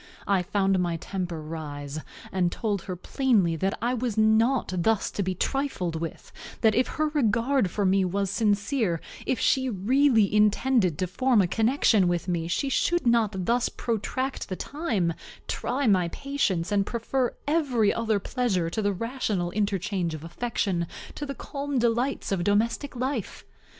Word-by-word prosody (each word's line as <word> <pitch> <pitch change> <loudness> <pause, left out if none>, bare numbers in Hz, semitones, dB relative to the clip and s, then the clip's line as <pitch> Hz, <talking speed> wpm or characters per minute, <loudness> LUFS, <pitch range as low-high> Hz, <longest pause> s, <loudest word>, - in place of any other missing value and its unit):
I 195 -2 +2
found 195 +1 +1
my 175 -2 0
temper 180 -2 -4
rise, 150 -2 -6 0.3
and 180 -2 +1
told 205 -2 -2
her 185 - -4
plainly 195 -3 +1
that 195 +4 -1
I 245 +1 +1
was 240 -3 -2
not 220 +2 +3
thus 200 +4 +1
to - - -2
be 185 -1 -1
trifled 200 - -1
with; 165 0 -6 0.3
that 220 -2 +5
if 250 +4 +2
her 310 0 +2
regard 250 -4 +2
for 200 +3 -1
me 190 +1 +3
was 195 +1 -1
sincere, 205 - +1 0.3
if 255 - 0
she 260 -1 +2
really 225 +1 +3
intended 210 - +3
to 185 - 0
form 240 +6 +2
a 195 - +5
connection 220 0 +3
with 175 +1 -1
me, 170 -2 -1
she 270 - -1 0.2
could 345 -4 0
not 215 -6 +2
thus 240 +3 +2
protract 255 +4 -3
the 185 - -2
time, 220 - -1 0.3
try 275 +2 -1
my 185 -6 +3
patience, 200 -7 -1
and 200 -1 +3
prefer 245 +2 -1
every 275 -9 +2
other 225 -2 0
pleasure 195 -6 -1
to 220 - -1
the 205 -1 +1
rational 210 -4 -2
interchange 195 -4 -1
of 155 - -9
affection, 175 -1 -2 0.3
to 295 - -5
the 275 - -5
calm 280 +2 -4
delights 240 +2 0
of 185 -3 0
domestic 225 +8 0
life. 255 -3 -3
210 Hz, 160 wpm, -26 LUFS, 185-250 Hz, 0.3 s, that